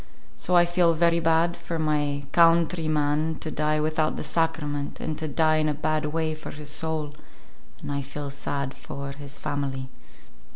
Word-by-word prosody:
So 180 - 0
I 175 0 +7
feel 175 -1 +3
very 170 +1 +3
bad 165 +1 +3
for 170 0 -4
my 145 -2 0
kawntree 165 0 +4
man 155 +1 +1
to 155 - -5
die 155 0 +1
without 155 0 +1
the - - -4
Sacrament, 150 -3 -1
and 155 - -3
to 160 - -3
die 155 +1 +3
in 155 0 +2
a 150 - 0
bad 155 +1 0
way 160 +1 -1
for 155 - -8
his 150 0 -7
soul, 155 -1 -2 0.7
and - - -4
I 140 0 -1
feel 140 +1 -6
sad 140 -1 -3
for 140 0 -7
his 145 +1 -5
family." 135 -2 -3
155 Hz, 175 wpm, -26 LUFS, 145-160 Hz, 0.7 s, I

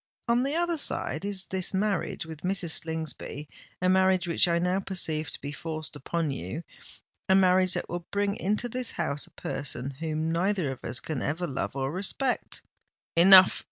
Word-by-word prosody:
On 235 +1 +3
the 275 +4 0
other 345 0 +1
side, 170 - -1
is 200 -1 -3
this 190 0 -2
marriage 195 -4 -1
with 160 -2 -9
Mrs. 180 -2 0
Slingsby—a 160 +1 -4
marriage 185 -1 +3
which 170 +1 +4
I 170 -1 +2
now 180 +2 +1
perceive 165 -5 -1
to - - -6
be 145 - -4
forced 155 +1 -5
upon 165 +2 -2
you—a 150 - -5
marriage 185 -1 +4
that - - -3
will 175 0 -5
bring 200 0 0
into 210 +5 0
this 250 0 -3
house 145 -4 -2
a - - -21
person 135 -1 -3
whom 160 0 -1
neither 180 -3 0
of 130 - -9
us 125 - 0
can 150 -4 -4
ever 165 +4 -1
love 135 -3 -3
or 135 0 -1
respect!" 205 - -1 0.5
"Enough! 185 +2 +8
175 Hz, 170 wpm, -28 LUFS, 155-195 Hz, 0.5 s, Enough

